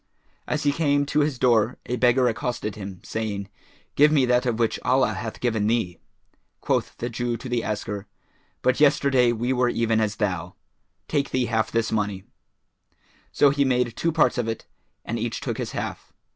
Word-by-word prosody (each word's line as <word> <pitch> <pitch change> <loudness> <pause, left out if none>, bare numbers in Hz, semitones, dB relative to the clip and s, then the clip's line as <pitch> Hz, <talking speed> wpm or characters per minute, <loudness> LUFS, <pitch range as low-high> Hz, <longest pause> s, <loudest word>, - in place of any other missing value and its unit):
As 150 - -1
he 145 - +3
came 145 -2 +1
to 145 +1 0
his 145 -3 +1
door, 120 -2 +3
a 125 - -2
beggar 125 +1 +3
accosted 120 -2 -2
him, 95 -3 -8
saying, 100 -3 -4 0.4
"Give 150 +2 +6
me 145 -4 +4
of 125 - 0
that 125 -1 +2
which 115 -1 0
Allah 130 -4 +2
hath 110 +3 -6
given 110 -4 0
thee." 110 -6 0 0.6
Quoth - - -1
the 120 - -3
Jew 120 0 -2
to 130 - -8
the 120 -2 -1
asker, 105 -1 -4 0.6
"But 130 +2 +2
yesterday 140 -4 +4
we 120 +3 -1
were 125 -1 +2
even 115 -2 +1
as 105 -2 0
thou; 95 -6 -2 0.5
take 140 -2 0
thee 130 -1 0
half 110 -1 0
this 115 0 0
money:" 105 -3 -1 1.1
so 145 - +4
he 140 0 +2
made 125 -3 +1
two 165 - 0
parts 155 -4 +2
of 120 - -1
it, 115 -1 -4 0.4
and 115 +1 -3
each 115 0 -2
took - - -4
his - - -4
half. - - -5
120 Hz, 185 wpm, -24 LUFS, 110-130 Hz, 1.1 s, Give